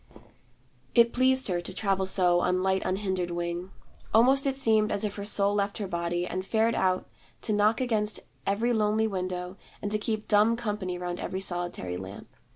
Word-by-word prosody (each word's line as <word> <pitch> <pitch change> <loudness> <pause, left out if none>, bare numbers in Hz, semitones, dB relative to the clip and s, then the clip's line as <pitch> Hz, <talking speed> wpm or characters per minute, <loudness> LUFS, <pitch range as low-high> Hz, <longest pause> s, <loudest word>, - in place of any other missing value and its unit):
It 235 -1 +5
pleased 260 +1 +3
her, 175 -3 -1
to 180 - -8
travel 195 -2 0
so 180 -2 +3
on 180 +1 +1
light 190 0 +1
unhindered 185 -2 -1
wing. 175 +1 -3 0.5
Almost 265 +5 +5
it 270 - 0
seemed 220 -5 +2
as 205 +1 0
if 210 -2 -1
her 200 0 -6
soul 200 -1 +2
left 200 0 -1
her 205 - -3
body, 175 0 -2
and 185 +1 -4
fared 225 +3 +1
out 185 -3 0 0.4
to 215 - 0
knock 210 +2 +3
against 215 -4 0 0.3
every 225 +5 +1
lonely 215 0 +2
window 185 -2 -4 0.2
and 205 - -4
to 215 - +1
keep 215 0 -3
dumb 215 +2 +4
company 205 -6 -3
round 175 0 -4
every 190 - -3
solitary 175 - -2
lamp. 95 +2 -9
200 Hz, 180 wpm, -28 LUFS, 180-220 Hz, 0.5 s, It